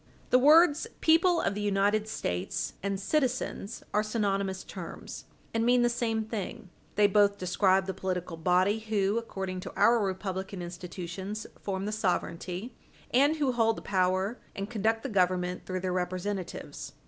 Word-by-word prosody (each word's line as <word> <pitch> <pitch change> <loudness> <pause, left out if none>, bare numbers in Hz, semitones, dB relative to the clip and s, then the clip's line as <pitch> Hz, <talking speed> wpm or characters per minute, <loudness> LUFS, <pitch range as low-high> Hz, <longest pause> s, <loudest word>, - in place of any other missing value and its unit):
The 250 - +6
words 310 - +6
"people 335 +2 +4
of - - 0
the 210 - -4
United 205 +1 +2
States" 90 - -3
and 200 0 -2
"citizens" 250 -2 -1
are 210 - +3
synonymous 200 -3 -1
terms, - - -8 0.3
and 225 0 +1
mean 245 +1 +4
the 240 - +4
same 225 -2 0
thing. 210 -3 -6 0.2
They 210 - +5
both 200 0 +4
describe 190 +1 +2
the 190 - -3
political 180 -2 -3
body 185 +5 +2
who, 215 -1 0
according 190 -5 -5
to - - -7
our 230 +3 +5
republican 190 -1 -3
institutions, 180 +4 -6 0.2
form 195 -1 -3
the 210 - -2
sovereignty 185 +1 -2 0.4
and 285 +5 +5
who 290 -4 +1
hold 225 -2 +2
the - - -8
power 190 +4 +1 0.2
and 195 0 -3
conduct 225 0 0
the - - -2
Government 180 -3 0
through 185 0 -2
their 185 -1 -1
representatives. 185 +1 -4
200 Hz, 155 wpm, -29 LUFS, 185-225 Hz, 0.4 s, The